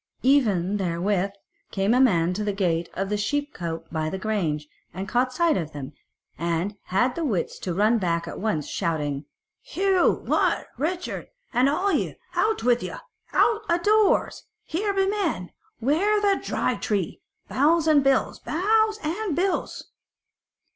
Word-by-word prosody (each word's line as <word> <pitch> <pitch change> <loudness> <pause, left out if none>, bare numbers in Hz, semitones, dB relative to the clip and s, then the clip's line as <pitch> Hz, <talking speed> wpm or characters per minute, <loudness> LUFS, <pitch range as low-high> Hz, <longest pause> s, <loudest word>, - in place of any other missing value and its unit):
Even 210 -8 +3
therewith 190 +1 0 0.4
came 195 +3 +1
a 250 - +4
man 180 -9 +3
to 210 +3 -2
the 205 -1 -1
gate 170 -4 0
of 195 +1 -2
the 210 - 0
sheep 290 +8 -1
cote 165 -1 -5
by 155 -1 -1
the 190 - -4
grange, 180 -8 -1 0.3
and 190 +1 -4
caught 250 +3 +1
sight 335 +3 +2
of 160 -4 -3
them, 145 0 -7 0.5
and 170 +4 -1
had 245 +7 +1
the 335 - -3
wits 210 - -1
to 180 - -3
run 215 +6 +3
back 170 -3 -1
at - - -6
once 190 -9 -1
shouting 155 -6 -1
out: 140 - -8 0.4
"Hugh, 380 -1 +1
Wat, - - +1
Richard, 345 +5 -3 0.3
and 255 +3 +4
all 370 +7 +1
ye, - - 0 0.2
out 435 - +1
with 245 0 +3
you, - - -5 0.4
out 445 -1 +3
a 340 - +4
doors! 420 +4 +2 0.2
Here 405 +6 -1
be 390 -1 +2
men! 385 - -1 0.3
Ware 340 - +2
the 400 -1 +2
Dry - - 0
Tree! 200 -6 -2 0.3
Bows 315 +4 +3
and 300 -3 +5
bills! 270 -1 +2
Bows 430 +5 +2
and 345 +2 -2
bills!" 375 +2 -2
230 Hz, 160 wpm, -25 LUFS, -, 0.5 s, and